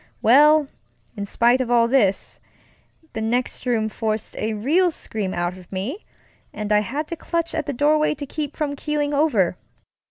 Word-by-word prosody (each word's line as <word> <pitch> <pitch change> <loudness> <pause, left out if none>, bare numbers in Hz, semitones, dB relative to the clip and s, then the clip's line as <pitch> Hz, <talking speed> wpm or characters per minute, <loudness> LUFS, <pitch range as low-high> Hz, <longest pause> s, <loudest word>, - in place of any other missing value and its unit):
Well, 295 +5 +6 0.5
in 200 -1 -5
spite 240 +5 +3
of 250 - -3
all 235 -1 +4
this, 220 -7 +1 0.7
that 220 - -4
next 245 +3 -2
room 225 -3 +1
forced 220 0 -3
a 220 0 -2
real 315 - +2
scream 215 - -4
out 175 0 -2
of 180 - -17
me, 215 - -4 0.5
and 210 0 -5
I 210 - +5
had 280 +9 -3
to 335 - -3
clutch 335 +1 -2
at 290 - -3
the - - -1
doorway 300 +3 +2
to 285 - -6
keep 295 0 -5
from 290 -2 -2
keeling 295 0 -2
over. 235 - +2
250 Hz, 170 wpm, -22 LUFS, 215-300 Hz, 0.7 s, Well